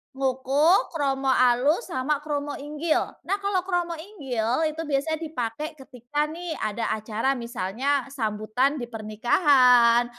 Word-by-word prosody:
ngoko 270 - +2
kromo 275 -3 -1
alus 260 - +3
sama 280 +1 -1
kromo 290 -1 -3
inggil 300 +3 -1 0.2
nah 390 - +1
kalau 390 -2 0
kromo 350 -3 -1
inggil 270 - -2
itu 310 +1 -5
biasanya 300 +2 -1
dipakai 300 +2 -4
ketika 275 +1 -4
nih 335 +1 -5
ada 215 +2 -2
acara 220 +5 -1
misalnya 245 +3 -2
sambutan 225 +4 0
di 240 - -4
pernikahan, 240 - +4
275 Hz, 125 wpm, -25 LUFS, 240-310 Hz, 0.2 s, pernikahan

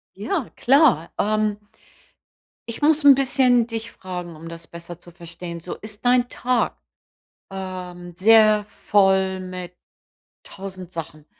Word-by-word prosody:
Ja, 345 -10 -2
klar. 260 - +3
Ähm 215 0 0 1.1
ich 230 - -7
muss 305 0 +3
'n 280 -1 +9
bisschen 255 -3 +3
dich 230 -1 -6
fragen, 180 -2 -7
um 160 +2 -11
das 165 0 -10
besser 170 0 -10
zu 175 - -16
verstehen. 170 0 -9
So, 175 - -7
ist 215 +2 -10
dein 245 0 +3
Tag, 250 -1 -1 0.7
ähm, 180 -2 -7
sehr 215 +1 +5 0.2
voll 190 -2 +3
mit 185 -1 -8 0.7
1.000 185 -2 -9
Sachen 155 -2 -8
190 Hz, 125 wpm, -22 LUFS, 175-230 Hz, 1.1 s, n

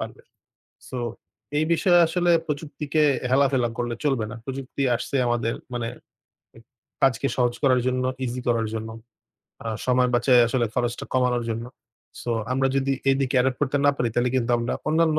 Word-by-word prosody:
পারবে। - - -6 0.7
So 130 - -5 0.6
এই 155 - +2
বিষয়ে 175 +1 +4
আসলে 175 +1 +1 0.2
প্রযুক্তিকে 150 0 -1 0.3
হেলাফেলা 130 -2 +3
করলে 120 -1 -2
চলবেনা। 120 -7 0
প্রযুক্তি 135 +1 -5
আসছে 130 - -4
আমাদের 120 -1 0 0.2
মানে 120 -1 -2 1.2
কাজকে 135 -1 +3
সহজ 120 -1 +2
করার 130 -3 +4
জন্য, 130 0 0 0.2
easy 125 0 -3
করার 115 -2 +1
জন্য। 110 0 -4 0.8
আর 110 -1 -2
সময় 125 0 +3
বাঁচায় 125 +1 +5
আসলে 120 -1 +1
খরচটা 120 -1 -1
কমানোর 125 -2 +2
জন্য। 115 +1 -3 0.6
So 120 - -3 0.2
আমরা 135 +1 +2
যদি 135 0 +1 0.2
এদিকে 135 -1 0
Adopt 130 0 0
করতে 145 -1 +1
না - - +7
পারি 125 -2 0
তাহলে 120 +1 +1
কিন্তু 120 -2 0
আমরা 120 0 -1
অন্যান্য 160 0 +3
125 Hz, 155 wpm, -24 LUFS, 120-140 Hz, 1.2 s, না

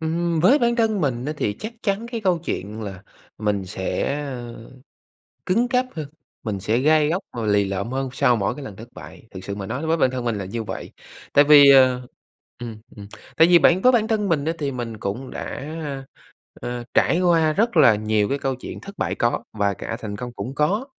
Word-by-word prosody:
Ừm 165 +1 -1
với 210 - +5
bản 235 -2 +1
thân 220 -3 +1
mình 130 -5 -1
á 150 - -2
thì 105 - -1
chắc 220 - -6
chắn 205 +3 -1
cái 230 - -2
câu 185 -4 +1
chuyện 110 - -5
là 95 -3 -7 0.4
mình 105 -2 -1
sẽ, 95 +8 -2
ơ, 120 -5 -7 0.8
cứng 230 +7 +2
cáp 255 0 +1
hơn, 155 -3 -5 0.4
mình 105 -4 -3
sẽ 110 +4 0
gai 150 +3 +3
góc 180 +5 -1
và 115 -2 -4
lì 105 -1 +3
lợm 100 +4 -3
hơn 135 0 -2
sau 130 -2 +3
mỗi 105 +3 -1
cái 145 - -8
lần 105 - -8
thất 115 +4 -11
bại, - - -12
thực 95 -1 -9
sự 100 0 -5
mà 100 - -5
nói 145 +10 -4
với 165 - +2
bản 130 -5 +2
thân 125 -2 -4
mình 115 -3 -1
là 100 - -4
như 115 +4 -4
vậy, - - -7 0.4
tại 145 - +7
vì, 145 -1 +8
ờ 130 -2 +5 0.6
ừm, 115 -3 -7 0.2
ừm, 100 -1 -9 0.3
tại 160 +2 +6
vì 175 - +7
bản 175 +2 +4
với 255 - +6
bản 220 -2 +2
thân 210 -3 0
mình 155 -5 +1
á 160 - 0
thì 145 -2 -2
mình 120 -3 -5
cũng 110 +7 -4
đã, - - -6 0.4
ơ, 135 -2 -5 0.6
ờ, 120 0 -5
trải 170 - +3
qua 165 -3 +3
rất 225 +4 0
là 135 -8 +7
nhiều 105 0 0
cái 140 - -1
câu 135 -1 -1
chuyện 125 - -8
thất 200 0 -11
bại - - -1
có 120 0 0
và 100 -2 0
cả 115 - -5
thành 105 -2 -5
công 120 +3 -6
cũng 120 +5 -6
có. 195 - 0
135 Hz, 230 wpm, -22 LUFS, 110-170 Hz, 0.8 s, vì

